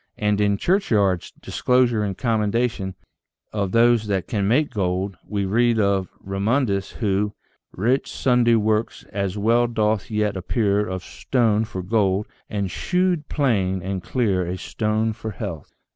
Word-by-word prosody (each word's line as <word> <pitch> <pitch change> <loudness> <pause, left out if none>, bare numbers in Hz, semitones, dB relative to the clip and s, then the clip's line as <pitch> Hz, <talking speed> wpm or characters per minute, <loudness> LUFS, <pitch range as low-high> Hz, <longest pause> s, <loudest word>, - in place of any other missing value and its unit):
And 105 -1 +1
in 100 -1 +2
Churchyard's 105 - +1
" - - -40
Discourse 125 -1 +2
and 105 -4 -1
Commendation 110 -3 0 0.6
of 100 -3 -1
those 115 -1 +4
that 95 -3 -1
can 100 -3 0
make 140 +8 +2
Gold," 95 0 -1
we 100 -2 -1
read 115 +4 +2
of 100 -2 +1
Remundus, 100 +1 -1
who 105 -2 0 0.4
Wrate 120 +8 0
sundry 125 -2 +3
workes, 110 0 0
as 100 0 -2
well 115 +3 +3
doth 110 -3 0
yet 105 -2 0
appeare 100 +2 +1
Of 95 -1 -4
stone 115 -4 +1
for 95 -5 -6
gold, 100 0 +1 0.2
and 100 -4 -2
shewed 180 - 0
plaine 95 - +1
and 95 0 -3
cleare 100 -5 0
A 90 +1 -3
stone 110 +3 -1
for 110 - -6
health. 100 - -6
105 Hz, 145 wpm, -23 LUFS, 95-115 Hz, 0.6 s, those